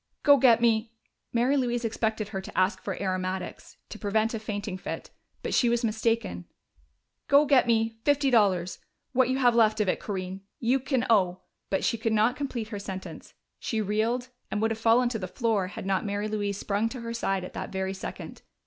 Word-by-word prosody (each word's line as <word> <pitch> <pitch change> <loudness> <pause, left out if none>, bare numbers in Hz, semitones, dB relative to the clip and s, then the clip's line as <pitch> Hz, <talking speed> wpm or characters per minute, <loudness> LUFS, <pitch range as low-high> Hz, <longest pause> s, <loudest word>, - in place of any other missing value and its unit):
Go 285 -1 +7
get 240 -3 +5
me 225 -1 +2 0.2
" - - -54
Mary 245 +4 +2
Louise 240 -3 0
expected 220 -1 -1
her 195 -3 -4
to - - -10
ask 185 +2 +2
for 195 - -4
aromatics, 185 -1 -4
to - - -8
prevent 220 +2 +1
a 225 - -2
fainting 205 -2 -4
fit, 185 - -6 0.3
but - - -2
she 240 - +4
was 235 +1 +1
mistaken 225 +1 -1 0.8
"go 285 +2 +6
get 275 -4 +4
me 225 -1 +4
my 225 - -25
fifty 285 -2 +3
dollars 190 -6 +2 0.3
what 255 -1 +3
you 260 - +1
have 245 -3 +4
left 220 -2 +4
of 210 - +1
it, - - +1
Corinne. 190 -1 -5 0.2
You 250 +3 +2
can 260 -1 0
owe 185 -5 +2
" - - -53
But 195 - 0
she 230 - 0
could 225 0 0
not 220 +3 +3
complete 250 -6 -4
her 205 -3 -5
sentence: 190 -1 -8 0.2
she 220 - -2
reeled, 220 +5 0 0.2
and 210 - -2
would 225 +1 +1
have 225 - -3
fallen 230 +2 +4
to 230 -2 -3
the 185 - -4
floor 215 -2 0
had 190 - -8
not 195 -1 0
Mary 205 0 -2
Louise 205 -2 -2
sprung 205 +3 -1
to 250 0 -7
her 230 0 -5
side 195 -5 -1
at 180 - -8
that - - -5
very 190 0 -2
second. 190 - -7
220 Hz, 210 wpm, -27 LUFS, 200-240 Hz, 0.8 s, Go